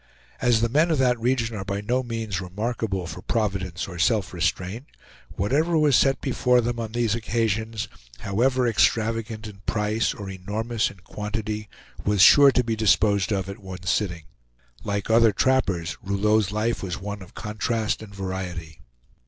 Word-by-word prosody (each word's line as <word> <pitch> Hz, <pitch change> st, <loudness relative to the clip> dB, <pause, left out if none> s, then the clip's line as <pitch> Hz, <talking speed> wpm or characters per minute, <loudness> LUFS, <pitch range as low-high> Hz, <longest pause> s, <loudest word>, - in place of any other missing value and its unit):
As 120 Hz, -2 st, +3 dB
the 115 Hz, -, +3 dB
men 155 Hz, +7 st, +3 dB
of 160 Hz, -, +2 dB
that 125 Hz, -2 st, +2 dB
region 115 Hz, -1 st, 0 dB
are 95 Hz, -, -4 dB
by 100 Hz, +1 st, -3 dB
no 120 Hz, +5 st, 0 dB
means 115 Hz, -5 st, -3 dB
remarkable 100 Hz, 0 st, -3 dB
for 90 Hz, +1 st, -7 dB
providence 100 Hz, -6 st, -2 dB
or 90 Hz, -3 st, -8 dB
self 95 Hz, 0 st, +1 dB
restraint, 90 Hz, -, -2 dB, 0.5 s
whatever 150 Hz, -, +1 dB
was 150 Hz, -4 st, +4 dB
set 135 Hz, +2 st, +3 dB
before 125 Hz, -2 st, +2 dB
them 120 Hz, 0 st, -1 dB
on 110 Hz, -1 st, -5 dB
these 120 Hz, -3 st, +1 dB
occasions, 110 Hz, -1 st, -1 dB, 0.3 s
however 125 Hz, +6 st, +1 dB
extravagant 115 Hz, -1 st, +1 dB
in 105 Hz, -2 st, -9 dB
price, 105 Hz, +1 st, 0 dB
or 100 Hz, -3 st, -7 dB
enormous 105 Hz, +5 st, -2 dB
in 95 Hz, -, -15 dB
quantity, 105 Hz, +2 st, -4 dB, 0.3 s
was 105 Hz, -1 st, +1 dB
sure 140 Hz, -1 st, +8 dB
to 125 Hz, -, +2 dB
be 115 Hz, -1 st, -1 dB
disposed 100 Hz, 0 st, +2 dB
of 95 Hz, -2 st, -1 dB
at 100 Hz, -, -7 dB
one 95 Hz, -2 st, -9 dB
sitting. 90 Hz, -2 st, -1 dB, 0.6 s
Like 100 Hz, +1 st, -2 dB
other 115 Hz, -1 st, +6 dB
trappers, 95 Hz, -9 st, 0 dB
Rouleau's 100 Hz, +1 st, +1 dB
life 110 Hz, +3 st, -1 dB
was 90 Hz, -3 st, -4 dB
one 100 Hz, +1 st, -6 dB
of 95 Hz, -, -13 dB
contrast 110 Hz, +1 st, -2 dB
and 110 Hz, -2 st, -10 dB
variety. 95 Hz, -5 st, -6 dB
105 Hz, 160 wpm, -24 LUFS, 95-115 Hz, 0.6 s, sure